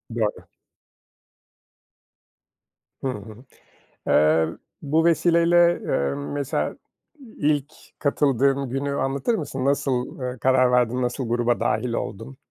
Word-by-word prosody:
Doğru. 110 Hz, -3 st, -2 dB, 2.6 s
Hı -, -, 0 dB
hı. 110 Hz, 0 st, -7 dB, 0.6 s
Eee, 80 Hz, +2 st, +4 dB, 0.3 s
bu 160 Hz, +3 st, +1 dB
vesileyle, 170 Hz, +1 st, +4 dB
eee, 70 Hz, 0 st, 0 dB
mesela 140 Hz, -1 st, -3 dB, 0.6 s
ilk 145 Hz, -1 st, 0 dB, 0.3 s
katıldığın 140 Hz, -1 st, +1 dB
günü 135 Hz, +3 st, -2 dB
anlatır 140 Hz, -, 0 dB
mısın? 135 Hz, -6 st, -4 dB
Nasıl, 135 Hz, -3 st, -1 dB
eee, 125 Hz, 0 st, -4 dB
karar 130 Hz, -1 st, +4 dB
verdin, 125 Hz, 0 st, +2 dB
nasıl 125 Hz, 0 st, -2 dB
gruba 120 Hz, 0 st, +1 dB
dâhil 115 Hz, +2 st, 0 dB
oldun? 65 Hz, -, -5 dB
130 Hz, 100 wpm, -23 LUFS, 120-145 Hz, 2.6 s, Eee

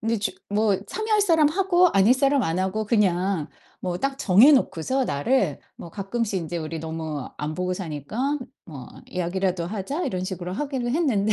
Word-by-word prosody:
근데 225 Hz, 0 st, 0 dB
주 200 Hz, -, -1 dB, 0.2 s
뭐 205 Hz, -1 st, +2 dB
참여할 435 Hz, -, 0 dB
사람 325 Hz, -6 st, +4 dB
하고 360 Hz, +1 st, +3 dB
아닐 200 Hz, +6 st, +5 dB
사람 275 Hz, 0 st, +2 dB
안 165 Hz, 0 st, -1 dB
하고 210 Hz, +3 st, -1 dB
그냥 190 Hz, -6 st, +1 dB, 0.3 s
뭐 180 Hz, -1 st, -3 dB
딱 275 Hz, 0 st, -2 dB
정해 215 Hz, +10 st, +6 dB
놓고서 260 Hz, -, +1 dB
날을 150 Hz, -, 0 dB, 0.2 s
뭐 170 Hz, -, -10 dB
가끔씩 205 Hz, +1 st, -2 dB
인제 170 Hz, +2 st, -4 dB
"우리 160 Hz, 0 st, -5 dB
너무 160 Hz, -3 st, -5 dB
안 150 Hz, +1 st, -3 dB
보고 180 Hz, 0 st, -1 dB
사니까 190 Hz, -, -3 dB, 0.3 s
뭐 140 Hz, -6 st, -9 dB, 0.2 s
이야기라도 180 Hz, 0 st, -2 dB
하자." 220 Hz, -, -3 dB
이런 185 Hz, -1 st, -2 dB
식으로 180 Hz, -1 st, -5 dB
하기로 265 Hz, -3 st, -2 dB
했는데 235 Hz, -9 st, +1 dB
200 Hz, 340 characters per minute, -24 LUFS, 175-265 Hz, 0.3 s, 정해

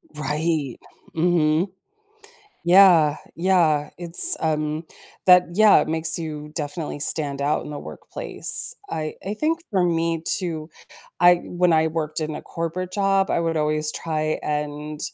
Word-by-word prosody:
Right, 150 Hz, -2 st, -2 dB, 0.4 s
mhm. 165 Hz, +1 st, +1 dB, 1.0 s
Yeah, 175 Hz, -5 st, +6 dB, 0.2 s
yeah, 165 Hz, -4 st, +1 dB
it's 170 Hz, -1 st, +5 dB
um, 155 Hz, 0 st, -2 dB, 0.4 s
that 180 Hz, -1 st, +6 dB
yeah, 215 Hz, +1 st, +6 dB
it -, -, -3 dB
makes 160 Hz, 0 st, 0 dB
you 150 Hz, -2 st, -6 dB
definitely 150 Hz, -1 st, -5 dB
stand 145 Hz, -2 st, -1 dB
out 150 Hz, +2 st, 0 dB
in -, -, -8 dB
the 145 Hz, -, -6 dB
workplace. 485 Hz, -, -1 dB
I 155 Hz, -1 st, -4 dB
I 200 Hz, -, -3 dB
think 320 Hz, +8 st, -1 dB
for 190 Hz, -4 st, +1 dB
me 165 Hz, -1 st, 0 dB
too, 165 Hz, -4 st, -3 dB, 0.5 s
I 175 Hz, +1 st, +6 dB
when 175 Hz, -1 st, +1 dB
I 160 Hz, 0 st, +3 dB
worked 155 Hz, -1 st, -3 dB
in 155 Hz, -1 st, -4 dB
a -, -, -8 dB
corporate 175 Hz, +2 st, -5 dB
job, 195 Hz, -1 st, +1 dB
I -, -, +1 dB
would 165 Hz, -1 st, -1 dB
always 155 Hz, 0 st, 0 dB
try 155 Hz, -1 st, -3 dB
and 150 Hz, 0 st, -4 dB
160 Hz, 145 wpm, -22 LUFS, 150-175 Hz, 1.0 s, Yeah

